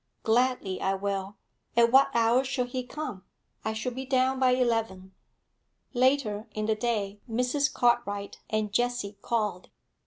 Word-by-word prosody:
'Gladly 230 -4 +1
I 195 0 +1
will. 195 0 -3 0.4
At 235 0 +5
what 270 +2 +6
hour 235 +3 +4
shall 255 -1 -1
he 255 +1 -3
come?' 250 -7 -6 0.4
'I 220 - -1
shall 220 +3 -3
be 260 +2 -5
down 260 0 +1
by 260 -1 +4
eleven.' 225 -7 -1 0.8
Later 245 -4 +1
in 215 0 -1
the 220 - +2
day, 210 -3 -2
Mrs. 250 +5 +1
Cartwright 235 -5 0
and 215 -2 -1
Jessie 240 -3 -1
called. 210 -6 -2
235 Hz, 145 wpm, -28 LUFS, 205-255 Hz, 0.8 s, what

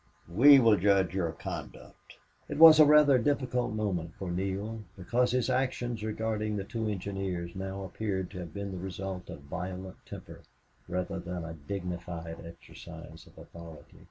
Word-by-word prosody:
"We 140 +8 +8
will 115 -4 +5
judge 95 -2 +2
your 90 -4 -1
conduct." - - -9 0.3
It - - -4
was 160 0 +10
a 155 - +9
rather 150 -3 +6
difficult 125 -3 0
moment 90 -6 -2
for 95 -2 -5
Neale, 100 +5 -3 0.2
because 120 +7 +1
his 125 0 +1
actions 125 -3 -1
regarding 110 -1 -2
the 100 - -2
two 110 +2 -4
engineers 95 -3 -4
now 95 +1 -5
appeared 95 -1 -3
to 95 - -7
have 85 -2 -7
been 100 +2 -5
the 95 - -6
result 95 0 -6
of - - -8
violent 90 +5 -7
temper, - - -10 0.5
rather 90 +1 -3
than 90 -1 -5
a 80 - -6
dignified 85 0 -6
exercise 85 0 -12
of - - -20
authority. 85 -2 -13
95 Hz, 155 wpm, -30 LUFS, 90-110 Hz, 0.5 s, was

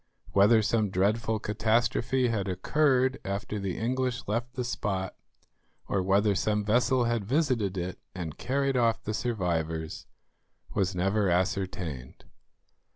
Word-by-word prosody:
Whether 105 +3 +5
some 110 0 +1
dreadful 105 +4 +1
catastrophe 115 +4 +1
had 105 -4 -1
occurred 130 +7 +2
after 100 +2 -3
the 95 -2 -3
English 125 +2 -1
left 120 +4 -2
the 125 - -1
spot, 95 -6 -2 0.7
or 100 - 0
whether 100 +2 +3
some 105 +2 0
vessel 120 +3 +3
had 115 -2 0
visited 120 - 0
it 90 +1 -4 0.2
and 85 -4 -5
carried 135 +1 0
off 115 -3 +2
the 110 - -3
survivors, 85 -9 -2 0.7
was 95 -1 0
never 95 +2 +1
ascertained. 90 -7 -2
105 Hz, 125 wpm, -28 LUFS, 95-120 Hz, 0.7 s, Whether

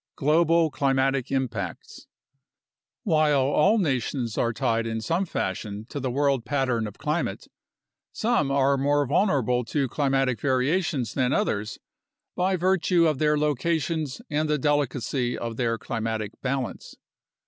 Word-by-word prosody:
Global 165 +2 +3
Climatic 135 -1 +1
Impacts 115 -10 -4 1.0
While 155 - +3
all 150 +10 +3
nations 130 - -1
are 115 - +1
tied 115 0 0
in 115 0 -2
some 165 - -1
fashion 105 -3 -4
to 145 - -5
the 130 -1 -2
world 135 -1 +1
pattern 130 -6 0
of 105 - -10
climate, 150 +3 -2 0.7
some 215 - 0
are 140 0 +2
more 145 +1 +2
vulnerable 130 - +1
to 135 +4 -1
climatic 135 -2 0
variations 135 - 0
than 130 -1 +1
others 110 - -1 0.6
by 185 +1 +1
virtue 180 -1 +2
of 155 -4 +1
their 150 -1 +2
locations 150 - -1
and 150 +1 -1
the 150 - +2
delicacy 135 -3 0
of 115 -1 -4
their 115 -2 0
climatic 110 -3 -3
balance. 135 -1 -3
135 Hz, 130 wpm, -25 LUFS, 120-155 Hz, 1.0 s, Global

